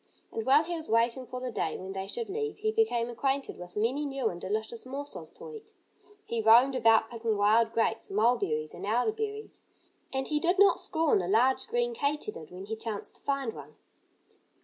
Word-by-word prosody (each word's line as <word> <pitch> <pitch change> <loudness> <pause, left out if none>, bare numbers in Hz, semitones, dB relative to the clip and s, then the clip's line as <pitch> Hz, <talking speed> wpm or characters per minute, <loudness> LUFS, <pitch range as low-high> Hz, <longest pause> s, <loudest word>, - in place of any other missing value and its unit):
And 225 +1 -4
while 285 +4 +6
he 345 +2 -4
was 320 -2 -4
waiting 235 +3 +1
for 255 - -5
the 250 -1 -4
day 160 -7 -2
when 190 +1 -7
they 190 0 -4
should 465 - -4
leave 435 +2 -3
he 435 +1 0
became 435 - +1
acquainted 270 +3 -2
with 180 +2 -9
many 245 +8 +1
new 270 -5 -1
and 175 0 -8
delicious 220 +3 -3
morsels 280 +3 -7
to 470 0 -10
eat. 440 -1 -12 0.5
He 230 -1 -2
roamed 235 +5 +6
about 225 -2 +4
picking 225 -2 -1
wild 220 +3 +4
grapes, 225 0 0
mulberries 200 -8 +1
and 180 - -9
elderberries. 425 - -2 0.5
And 265 0 -2
he 300 -1 0
did 350 +4 +1
not 400 0 +6
scorn 320 - +2
a 175 - -3
large, 245 - +3
green 480 +1 0
katydid 280 - -3
when 185 +2 -9
he 220 +2 -4
chanced 220 -2 -5
to - - -25
find 275 -5 -1
one. - - -11
245 Hz, 195 wpm, -29 LUFS, 220-315 Hz, 0.5 s, while